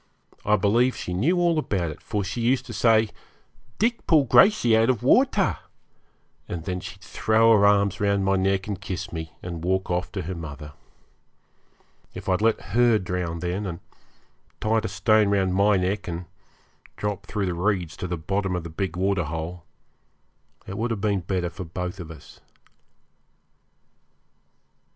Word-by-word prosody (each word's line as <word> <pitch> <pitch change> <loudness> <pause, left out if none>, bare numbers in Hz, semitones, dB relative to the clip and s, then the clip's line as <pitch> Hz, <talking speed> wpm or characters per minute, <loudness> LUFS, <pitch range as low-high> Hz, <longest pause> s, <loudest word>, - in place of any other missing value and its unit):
I 105 - +3
believe 115 +6 +2
she 90 - -5
knew 140 - +2
all 170 -2 +2
about 90 - -1
it, 75 - -11
for 105 -2 -2
she 100 +5 -4
used 125 +2 +1
to 120 - -8
say, 110 -1 +3 0.7
'Dick 230 +1 0
pull 155 -4 +5
Gracey 125 - +5
out 115 +2 +3
of 125 -5 0
water;' - - +3 0.9
and 85 -2 -5
then 90 -1 -2
she'd 95 +2 -9
throw 110 +4 +3
her 100 -1 +5
arms 100 -1 +2
round 100 -1 +2
my 95 0 +3
neck 95 0 +1
and 100 -2 -4
kiss 95 -4 -5
me, 80 -1 -6
and 85 -2 -6
walk 95 +1 0
off 90 0 -1
to - - -3
her 90 +4 -4
mother. 75 -3 -8 1.4
If - - -8
I'd 95 +1 +1
let 110 -2 0
her 120 -1 +5
drown 90 -3 -3
then, 90 +3 -2
and 85 -2 -5 0.8
tied 110 0 +1
a - - 0
stone 110 -2 +3
round 95 -2 +1
my 100 +1 +4
neck 95 +2 -1
and 85 0 -4 0.7
dropped 105 -1 -3
through 105 -3 -2
the 90 - -1
reeds 90 -2 -1
to 90 - -4
the 90 0 -3
bottom 95 +3 -1
of 90 - -3
the 85 - -8
big 90 +1 -3
waterhole, 90 -3 -2 1.0
it 95 - -6
would 120 +2 0
have 110 -4 -3
been 100 -2 +1
better 90 -1 -2
for 95 +1 -7
both 90 +3 -5
of 85 -3 -7
us. 80 - -13
95 Hz, 170 wpm, -25 LUFS, 90-110 Hz, 1.4 s, pull